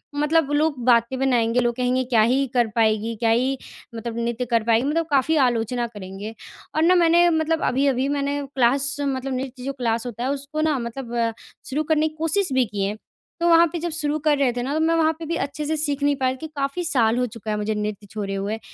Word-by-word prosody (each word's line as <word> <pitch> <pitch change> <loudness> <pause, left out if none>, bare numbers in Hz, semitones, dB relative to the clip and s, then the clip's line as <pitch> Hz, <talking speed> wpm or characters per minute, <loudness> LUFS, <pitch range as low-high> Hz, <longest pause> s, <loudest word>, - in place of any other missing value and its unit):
मतलब 300 0 +2
लोग 295 0 +1
बातें 235 +1 +3
बनाएँगे 245 -3 +2
लोग 240 -1 +1
कहेंगे 255 +1 +1
क्या 240 -3 +2
ही 255 +5 +3
कर 240 -2 +3
पाएगी 220 0 +1
क्या 225 +1 0
ही 255 +4 +2 0.4
मतलब 230 0 -5
नृत्य 235 +1 -2
कर 230 -2 +1
पाएगी 230 +2 +2
मतलब 330 +3 0
काफ़ी 285 +2 +2
आलोचना 240 -1 +1
करेंगे। 205 0 -8 0.4
और 315 - +2
न 360 +2 +5
मैंने 345 +1 +5
मतलब 320 0 0
अभी-अभी 265 0 +1
मैंने 285 0 -1 0.2
क्लास 275 +3 +2
मतलब 270 -2 -2
नृत्य 255 0 -5
जो 275 +1 -3
क्लास 235 -3 -1
होता 240 -1 -5
है 260 - -1
उस 280 0 -4
को 310 - 0
न 310 -2 +1
मतलब 235 +1 -6
अ, 230 -1 +1 0.4
शुरू 290 +4 -1
करने 310 0 +2
की 310 - -9
कोशिश 325 +2 0
भी 260 -1 +3
की 205 -2 -3
है। 205 +2 -2 0.4
तो 340 - +1
वहाँ 335 0 +7
पे 340 - -2
जब 345 +2 -3
शुरू 300 -1 0
कर 300 -1 +2
रहे 275 -3 +2
थे 245 0 -3
न 270 +3 -2
तो 310 - 0
मैं 325 +1 +2
वहाँ 320 -1 +3
पे 330 - -6
भी 330 +2 -2
अच्छे 285 +2 -5
से 315 +2 0
सीख 290 -2 0
नहीं 285 0 +3
पाई 260 -1 0
कि 315 - -7
काफ़ी 280 +5 -2
साल 240 -8 +2
हो 250 - +1
चुका 225 -2 -6
है - - 0
मुझे 210 +1 -1
नृत्य 210 -1 -4
छोड़े 200 -2 -4
हुए। 200 +3 -3
260 Hz, 235 wpm, -23 LUFS, 230-300 Hz, 0.4 s, वहाँ